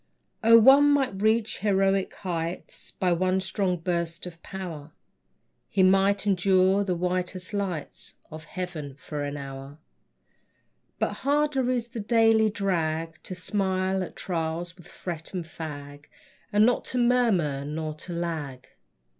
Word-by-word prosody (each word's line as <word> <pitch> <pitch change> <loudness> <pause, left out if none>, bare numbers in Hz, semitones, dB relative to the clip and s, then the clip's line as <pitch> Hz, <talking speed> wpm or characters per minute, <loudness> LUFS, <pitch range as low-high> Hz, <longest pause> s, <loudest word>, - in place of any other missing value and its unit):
O, 230 +1 +8
one 270 +5 +7
might 270 -9 +1
reach 220 +1 +2
heroic 195 -1 +2
heights 170 -2 -4
By 185 -1 -1
one 185 +2 +2
strong 190 -1 -1
burst 170 0 -2
of 170 -2 -10
power. 165 -6 -7 0.8
He 190 - +2
might 195 +2 +4
endure 190 0 +3
the 185 -3 -1
whitest 180 +2 -2
lights 190 -7 -3 0.2
Of 155 +1 -9
heaven 165 -7 -6
for 145 +1 -6
an 145 0 -4
hour; 135 0 -8 1.2
But - - 0
harder 285 -2 +1
is 240 -2 -1
the 235 -1 -6
daily 225 0 +4
drag, 165 -5 -2
To 185 - -7
smile 190 0 0
at 185 - -6
trials 170 0 -3
which 175 - -16
fret 170 0 -7
and 175 -2 -3
fag, 145 -3 -8 0.5
And 210 +1 +5
not 245 - +2
to 255 - -3
murmur 225 - +2
nor 155 +1 -4
to 155 +4 -9
lag. 155 -7 -4
185 Hz, 140 wpm, -26 LUFS, 160-205 Hz, 1.2 s, O